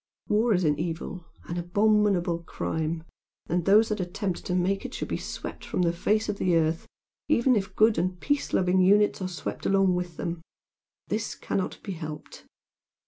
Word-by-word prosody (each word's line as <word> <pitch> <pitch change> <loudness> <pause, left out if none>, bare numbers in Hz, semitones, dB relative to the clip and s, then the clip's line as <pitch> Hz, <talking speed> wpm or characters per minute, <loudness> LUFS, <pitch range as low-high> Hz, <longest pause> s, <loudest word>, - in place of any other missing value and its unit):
War 220 +3 +3
is 180 - +1
an 150 -2 +2
evil, 165 +1 -4 0.2
an 170 - -4
abominable 195 -1 +2
crime 160 -1 -3 0.4
and 175 0 -1
those 215 +3 +5
that 215 - -1
attempt 185 0 -3
to 180 - 0
make 190 +2 +1
it - - -6
should - - -4
be - - -1
swept - - -7
from 180 - -1
the 170 -1 +2
face 215 +5 +1
of 205 -1 -3
the 180 -2 +2
earth 160 0 +1 0.4
even 255 -3 +4
if 195 -2 -2
good 220 -2 +4
and 180 +1 -1
peace 290 +6 0
loving 185 0 +3
units 205 +2 +4
are 185 - -1
swept 180 -2 -5
along 195 -1 +4
with 180 -2 -3
them. 170 -1 -3 0.7
This 215 +1 -2
cannot 190 - -3
be 200 - -5
helped." 155 -4 -8
185 Hz, 180 wpm, -27 LUFS, 170-205 Hz, 0.7 s, those